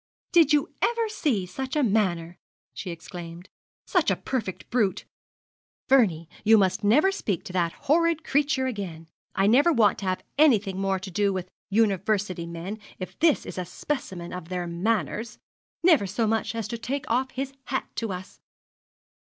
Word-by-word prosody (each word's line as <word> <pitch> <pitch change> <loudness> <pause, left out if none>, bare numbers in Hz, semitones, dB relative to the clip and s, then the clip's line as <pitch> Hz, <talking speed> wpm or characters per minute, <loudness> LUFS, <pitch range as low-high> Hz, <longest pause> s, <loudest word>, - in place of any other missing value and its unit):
'Did 330 -4 +5
you 295 -1 +2
ever 465 -1 +1
see 285 - 0
such 260 - -5
manner?' 195 - +1 0.3
she 190 - -6
exclaimed; 170 +1 -8 0.4
'such - - +2
a - - +3
perfect 225 -8 -4
brute? 215 -5 +1 0.8
Vernie, 190 -12 +3 0.2
you 220 +1 +7
must 190 0 +2
never 295 - +5
speak 200 - -2
to 180 - -9
that 170 -2 +1
horrid 330 +1 +3
creature 285 -2 +1
again. 190 -10 -5 0.3
I 195 - +3
never 270 +11 +5
want 220 - +3
to 200 - -5
have 185 0 -1 0.2
anything 210 -11 +4
more 195 -1 +1
to 190 +1 -8
do 200 +2 +2
with 185 -2 -4 0.2
University 200 -4 +1
men 170 +6 -6 0.2
if 185 - -8
this 320 -3 +3
is - - -6
a - - -1
specimen 185 -7 -4
of 180 -2 -7
their 180 -1 -2
manners! 215 +5 -1 0.5
Never 315 - +5
so 215 +4 0
much 225 +1 0
as 225 -2 -3
to 235 - -4
take 265 +4 -3
off 255 +3 +1
his 270 +1 -4
hat 265 - -2
to 225 -3 -2
us!' 185 0 -8
210 Hz, 165 wpm, -26 LUFS, 185-265 Hz, 0.8 s, you